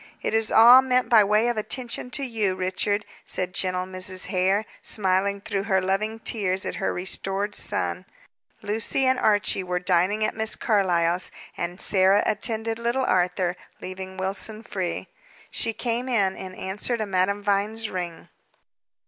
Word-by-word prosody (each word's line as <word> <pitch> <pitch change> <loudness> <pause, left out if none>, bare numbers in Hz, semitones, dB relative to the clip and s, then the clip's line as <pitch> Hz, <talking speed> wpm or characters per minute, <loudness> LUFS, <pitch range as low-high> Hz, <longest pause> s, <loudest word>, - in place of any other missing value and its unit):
"It - - -1
is 225 0 +2
all 240 +3 +9
meant 255 -1 +1
by 225 -3 +7
way 210 +3 +2
of 240 -2 0
attention 245 +3 -3
to 280 +2 -3
you, 215 -6 0
Richard," 190 +3 -1 0.2
said 180 -1 -4
gentle 185 -1 -1
Mrs. 185 0 -3
Hare, 190 +2 +1 0.2
smiling 200 0 0
through 200 -1 -3
her 190 -3 +2
loving 195 +4 -1
tears 195 -4 -2
at - - -4
her - - -1
restored 195 +2 -2
son. - - 0 0.6
Lucy 220 +5 0
and 260 -1 +3
Archie 205 -2 +2
were 180 0 -2
dining 185 +4 +1
at - - -2
Miss 220 0 0
Carlyle's, 180 -5 +1 0.3
and 175 +2 -4
Sarah 190 +1 +4
attended 225 +1 -1
little 240 +3 0
Arthur, 180 0 +1 0.2
leaving 190 0 -7
Wilson 200 +4 -4
free. 185 -5 -4 0.4
She 230 - 0
came 240 +2 -2
in, 200 -6 +2
in 185 -1 -8
answer 205 +6 -2
to 215 - -2
Madame 200 +1 0
Vine's 205 +2 0
ring. 175 -2 -5
200 Hz, 155 wpm, -25 LUFS, 185-220 Hz, 0.6 s, all